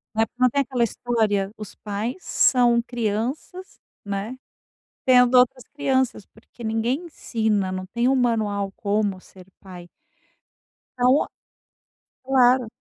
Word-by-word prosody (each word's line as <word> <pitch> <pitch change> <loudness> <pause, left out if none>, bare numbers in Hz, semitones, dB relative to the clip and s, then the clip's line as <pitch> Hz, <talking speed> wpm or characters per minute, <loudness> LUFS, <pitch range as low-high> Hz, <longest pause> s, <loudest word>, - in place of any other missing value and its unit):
É, 225 0 +2
porque 250 - -18
não 255 - +6
tem 280 +4 +1
aquela 250 -2 -1
história, 215 -4 0
os 215 -2 -9
pais 210 - -4
são 240 -7 +3
crianças, 245 - -4 0.3
né, 200 +5 -4 0.7
tendo 250 -1 +5
outras 250 0 +2
crianças 260 -7 0
porque 230 +2 -17
ninguém 230 +8 -1
ensina, 220 - -1
não 185 0 -5
tem 235 +6 0
um 270 - +3
manual 215 -6 0
como 205 -2 -1
ser 185 -2 -16
pai. 180 -3 -12 1.1
Então 250 +3 +3 1.0
Claro. 255 -1 +4
235 Hz, 120 wpm, -23 LUFS, 205-255 Hz, 1.1 s, não